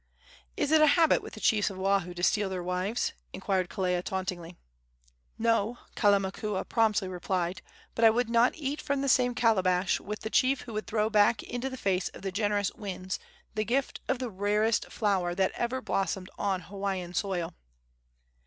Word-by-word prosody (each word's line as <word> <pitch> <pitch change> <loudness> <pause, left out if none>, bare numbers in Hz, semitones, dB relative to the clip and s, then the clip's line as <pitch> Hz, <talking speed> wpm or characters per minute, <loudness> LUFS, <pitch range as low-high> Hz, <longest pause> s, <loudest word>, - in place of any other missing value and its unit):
"Is 285 - 0
it 315 -1 +6
a 310 - +7
habit 330 -2 +4
with - - -10
the - - -8
chiefs 215 -3 +2
of 195 - -8
Oahu 190 -2 0
to 175 - -5
steal 205 +1 +2
their 185 -2 -4
wives?" 185 +6 -1 0.2
inquired 185 -2 -1
Kelea, 180 -3 0
tauntingly. 185 -3 -4 0.8
"No," 230 0 +1 0.2
Kalamakua 200 -1 +1
promptly 215 -4 +2
replied; 180 -1 -2 0.3
"but 230 - -1
I 225 - +9
would 240 +2 +1
not 235 +2 +3
eat 290 -1 -3
from 280 -1 -1
the - - 0
same 250 -2 +3
calabash 185 -6 +2
with 210 +2 -6
the 220 - -5
chief 260 +1 +3
who 235 - -9
would 215 0 -4
throw 215 -1 +1
back 210 +1 +4
into 245 +2 -4
the 260 - -7
face 190 -5 0
of - - -11
the 195 - -2
generous 205 0 0
winds 185 -2 -5 0.3
the 215 -1 0
gift 255 +5 -1
of - - +1
the 250 -2 -4
rarest 210 +3 +1
flower 190 -5 0
that 190 0 +2
ever 250 +2 -2
blossomed 195 -2 -2
on 195 -2 -1
Hawaiian 190 -1 -4
soil!" 180 -3 -2
205 Hz, 180 wpm, -29 LUFS, 185-230 Hz, 0.8 s, I